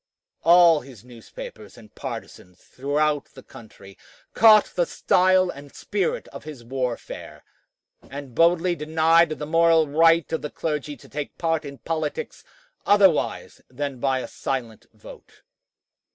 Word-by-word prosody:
All 170 -2 +6
his 125 -4 -15
newspapers 115 -3 -11
and 110 -2 -16
partisans 90 -1 -9
throughout 145 +2 -1
the - - -12
country 105 -6 -15 0.3
caught 215 -2 +6
the 175 -2 +1
style 185 0 +2
and 140 0 -13
spirit 200 -3 -2
of - - -11
his 150 -6 -10
warfare, 125 -1 -5 0.7
and 140 -3 -9
boldly 175 +4 +3
denied 160 +2 +3
the 155 -1 -5
moral 165 0 +3
right 165 +2 +3
of 160 - -1
the 150 - -5
clergy 150 -2 -4
to - - -17
take 145 0 -6
part 165 -2 -1
in 140 -1 -9
politics 165 - -4 0.4
otherwise 195 -6 +2
than 140 0 -5
by 130 0 0
a - - -6
silent 120 -5 -5
vote. - - -16
150 Hz, 135 wpm, -23 LUFS, 135-165 Hz, 0.7 s, All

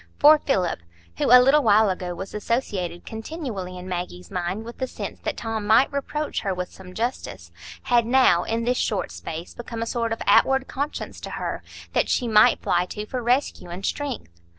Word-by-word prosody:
For 300 +1 +7
Philip, 185 - 0 0.4
who - - +1
a 250 - +9
little 270 +4 +5
while 215 -4 +4
ago 180 -1 -4
was 190 +3 -7
associated 205 -6 -2
continually 220 - -6
in 180 +1 -8
Maggie's 180 0 -5
mind 180 +5 -3
with 235 - -10
the 260 - -1
sense - - -7
that - - -3
Tom 225 -2 -3
might 240 +6 +5
reproach 300 +2 -2
her 195 -3 -2
with 180 0 -4
some 185 -1 -12
justice, 100 - -4 0.3
had 240 -2 +3
now, 245 -9 +5
in 230 +1 -2
this 245 +1 +1
short 195 -4 -1
space, 165 +2 -7
become 230 -1 -5
a - - -3
sort 230 -1 -2
of 225 - -2
outward 265 0 +4
conscience 285 +2 -4
to - - -6
her, - - -4 0.3
that - - +1
she 245 - +1
might 215 -1 +5
fly 175 +1 +1
to 210 +2 -6
for 250 +3 -4
rescue 245 -6 0
and 180 +3 -6
strength. 245 - -4
220 Hz, 195 wpm, -24 LUFS, 180-250 Hz, 0.4 s, a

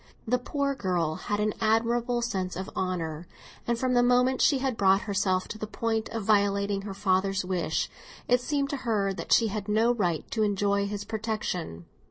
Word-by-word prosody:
The 250 +2 +2
poor 280 +2 -1
girl 180 - -1
had 205 +5 -3
an 210 0 +1
admirable 235 +2 +1
sense 190 -6 -2
of 190 +1 -5
honour; 170 -3 -3 0.4
and 235 -1 +1
from 255 +1 0
the 245 - +5
moment 250 +1 +3
she 280 - +4
had 260 -2 -1
brought 195 -1 +4
herself 195 -2 0
to 215 - -6
the 215 - -4
point 225 0 -2
of 225 -2 -4
violating 200 -1 +2
her 195 -1 -6
father's 195 -1 +1
wish, 180 -2 -1 0.4
it 245 0 +3
seemed 280 +1 -1
to 285 - -2
her 210 -6 0
that - - -7
she 225 -2 +5
had 205 0 -4
no 220 +3 +3
right 175 -9 -1
to 220 - -1
enjoy 200 -1 +1
his 205 0 -4
protection. 205 - -4
210 Hz, 190 wpm, -27 LUFS, 195-235 Hz, 0.4 s, the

